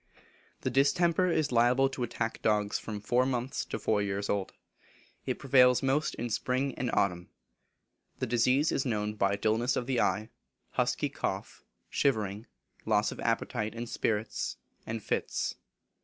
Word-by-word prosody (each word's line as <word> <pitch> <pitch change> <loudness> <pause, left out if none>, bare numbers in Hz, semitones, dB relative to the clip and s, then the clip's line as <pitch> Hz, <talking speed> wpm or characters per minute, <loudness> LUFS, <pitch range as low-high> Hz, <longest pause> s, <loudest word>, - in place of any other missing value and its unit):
The - - -1
distemper 170 +6 +3
is 155 -5 +1
liable 125 +3 +4
to 135 - -6
attack 115 -1 -2
dogs 105 -1 +1
from 105 -2 -6
four 120 +4 +2
months 130 0 -1
to - - -4
four 105 -2 +1
years 100 0 -1
old. 100 -2 -1 0.8
It - - -1
prevails 125 -2 +5
most 135 +3 +1
in 120 0 -4
spring 130 +4 0
and 125 0 -2
autumn. 90 -4 0 0.9
The - - -1
disease 125 +6 +3
is 135 - +1
known 105 -4 -1
by 100 -1 +1
dulness 110 +4 +1
of 125 - -1
the 125 -1 +1
eye, 105 +4 0 0.4
husky - - 0
cough, - - -4 0.2
shivering, 110 -4 0 0.4
loss - - +2
of - - -8
appetite 105 +1 -1
and 120 +1 -4
spirits, 110 -2 -2 0.3
and 110 -1 -4
fits. - - -2
120 Hz, 150 wpm, -30 LUFS, 105-130 Hz, 0.9 s, prevails